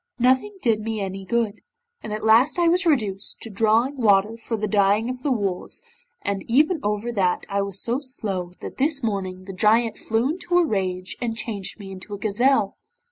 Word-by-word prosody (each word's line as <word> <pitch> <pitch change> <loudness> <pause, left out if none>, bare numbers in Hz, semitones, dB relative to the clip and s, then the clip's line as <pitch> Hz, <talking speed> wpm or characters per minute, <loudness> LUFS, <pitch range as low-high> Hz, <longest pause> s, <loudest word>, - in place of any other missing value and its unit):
Nothing 260 +11 +2
did 225 -3 +3
me 220 0 -3
any 195 -1 -4
good, 230 -1 -1 0.4
and 215 - -7
at 215 0 -4
last 230 +9 +5
I 345 -1 +3
was 355 +2 +3
reduced 210 -10 0
to 225 - -7
drawing 225 +6 +2
water 210 -2 +3
for 230 0 -4
the 215 0 -2
dyeing 205 +3 +2
of 255 0 -8
the 280 - 0
wools, 200 - -1 0.4
and 200 -2 -1
even 305 +8 +3
over 210 +2 -1
that 185 -5 0
I 200 0 0
was 200 -1 -3
so 240 +3 0
slow 200 -10 -3
that - - -7
this 280 0 +1
morning 190 -4 -2
the 195 - -7
Giant 220 +4 +3
flew 225 +5 0
into 355 +1 -1
a 350 - +5
rage 185 - -2
and 230 -2 -2
changed 210 -3 -3
me 195 -1 -8
into 190 +2 -7
a - - -7
gazelle. 215 +2 +1
220 Hz, 195 wpm, -23 LUFS, 200-250 Hz, 0.4 s, last